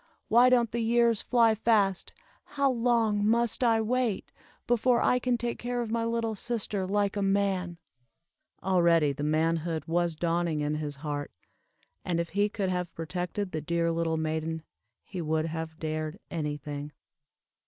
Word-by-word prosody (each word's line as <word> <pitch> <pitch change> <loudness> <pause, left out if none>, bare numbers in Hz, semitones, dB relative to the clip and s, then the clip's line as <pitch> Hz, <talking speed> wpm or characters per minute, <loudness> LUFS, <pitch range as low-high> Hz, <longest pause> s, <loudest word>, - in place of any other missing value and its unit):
"Why 240 +3 +6
don't 240 -3 +3
the 235 - -2
years 235 -1 +3
fly 230 -3 +4
fast? 210 -4 +1 0.3
How 280 -2 +1
long 230 -4 +2
must 235 +3 +2
I 225 -2 +4
wait, 240 -2 -1 0.3
before 240 +1 +3
I 250 - +3
can 250 -1 0
take 235 0 -3
care 245 0 -2
of 235 -2 -3
my 230 0 0
little 230 -1 -1
sister 210 -3 -2
like 200 0 0
a 205 - -1
man?" 195 -3 0 0.9
Already 170 -5 +3
the 145 - -7
manhood 160 +2 0
was 170 0 0
dawning 170 -1 0
in 150 +1 0
his 150 -1 -3
heart; 145 -1 -3 0.7
and 170 -2 -1
if 170 -1 -2
he 205 +3 +1
could 200 -2 -2
have 180 -1 -3
protected 180 +4 -3
the 155 - -3
dear 170 +2 0
little 165 -1 0
maiden, 160 0 -2 0.4
he 185 -3 -6
would 160 0 0
have 160 0 -5
dared 155 +1 -3
any 150 -3 -2
thing. 145 +1 -7
185 Hz, 160 wpm, -28 LUFS, 160-230 Hz, 0.9 s, Why